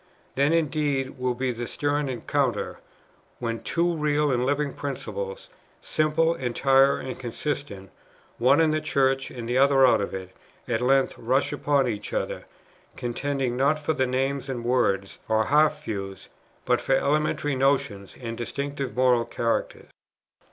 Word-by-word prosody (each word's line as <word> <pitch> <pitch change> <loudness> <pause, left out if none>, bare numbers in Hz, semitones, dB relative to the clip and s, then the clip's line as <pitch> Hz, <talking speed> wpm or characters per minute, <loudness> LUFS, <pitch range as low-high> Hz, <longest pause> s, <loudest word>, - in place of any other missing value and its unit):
Then 140 +3 +2
indeed 145 -5 0
will 125 -1 0
be 130 +1 -1
the 120 0 -5
stern 145 -1 -1
encounter, 125 -3 -1 0.6
when 115 -2 -3
two 170 0 0
real 150 -1 +1
and 125 -1 +1
living 145 0 0
principles, 475 - -5 0.3
simple, 155 +2 +1
entire, 135 0 +3
and 130 - -6
consistent, 120 - -4 0.5
one 125 +6 +5
in 160 -1 +4
the 155 0 0
Church, 135 -3 +1
the 120 0 -3
other 135 -1 +6
out 125 - +4
of 100 - -3
it, 95 -1 -8 0.3
at 115 -1 0
length 135 +2 +3
rush 130 +5 +1
upon 145 -2 +1
each 105 -3 -4
other, - - -3 0.5
contending 130 +1 -2
not 140 +4 +2
for 150 +1 -1
names 135 0 -1
and 120 -3 -4
words, 100 -6 0
or 110 0 +2
half 150 +1 +3
views, 100 -6 -6 0.4
but 125 -1 +2
for 135 - +2
elementary 145 +1 +1
notions 130 -7 0
and 115 -2 -5
distinctive 140 +2 -4
moral 125 -2 +3
characters." 115 0 -2
135 Hz, 145 wpm, -25 LUFS, 120-145 Hz, 0.6 s, other